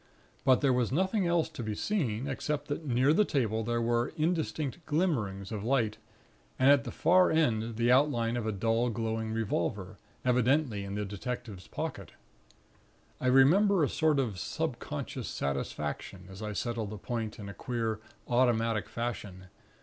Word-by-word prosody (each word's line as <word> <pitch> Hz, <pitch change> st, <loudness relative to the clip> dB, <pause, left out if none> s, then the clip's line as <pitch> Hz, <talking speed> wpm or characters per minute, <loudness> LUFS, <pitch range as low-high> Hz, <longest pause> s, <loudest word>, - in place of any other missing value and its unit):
But 130 Hz, -2 st, +4 dB
there 135 Hz, -3 st, +3 dB
was 125 Hz, -2 st, +1 dB
nothing 190 Hz, -, +1 dB
else 170 Hz, -1 st, +2 dB
to -, -, -7 dB
be 110 Hz, -2 st, -3 dB
seen, 130 Hz, -, -1 dB
except 145 Hz, +1 st, -3 dB
that 145 Hz, +2 st, -3 dB
near 130 Hz, +4 st, +3 dB
the 210 Hz, -, +5 dB
table 115 Hz, -, 0 dB
there 120 Hz, +1 st, 0 dB
were 120 Hz, +3 st, +1 dB
indistinct 160 Hz, -1 st, -1 dB
glimmerings 115 Hz, -, 0 dB
of 105 Hz, -2 st, -4 dB
light, 115 Hz, -3 st, +1 dB, 0.6 s
and 130 Hz, +2 st, +6 dB
at 140 Hz, -1 st, +4 dB
the 120 Hz, -, -4 dB
far 180 Hz, +1 st, +4 dB
end 115 Hz, -8 st, +1 dB
the 120 Hz, +2 st, +2 dB
outline 125 Hz, -4 st, +3 dB
of 120 Hz, -2 st, -2 dB
a -, -, +1 dB
dull 115 Hz, +4 st, +1 dB
glowing 110 Hz, -1 st, -2 dB
revolver, 100 Hz, -3 st, -2 dB, 0.3 s
evidently 125 Hz, -2 st, +2 dB
in 100 Hz, 0 st, -5 dB
the 105 Hz, 0 st, -2 dB
detective's 105 Hz, -1 st, -6 dB
pocket. -, -, -5 dB, 1.1 s
I 130 Hz, -, -1 dB
remember 165 Hz, +9 st, +5 dB
a -, -, +3 dB
sort 155 Hz, -2 st, +2 dB
of 115 Hz, -9 st, -1 dB
subconscious -, -, -4 dB
satisfaction, 75 Hz, +6 st, -4 dB
as 95 Hz, +2 st, -10 dB
I 105 Hz, -1 st, -3 dB
settled 115 Hz, -1 st, -2 dB
the 105 Hz, -, -6 dB
point 110 Hz, 0 st, -4 dB
in 105 Hz, -, -8 dB
a 100 Hz, -, -7 dB
queer 115 Hz, -3 st, -2 dB, 0.3 s
automatic 115 Hz, -3 st, +2 dB
fashion. 105 Hz, -6 st, -5 dB
120 Hz, 160 wpm, -30 LUFS, 110-140 Hz, 1.1 s, and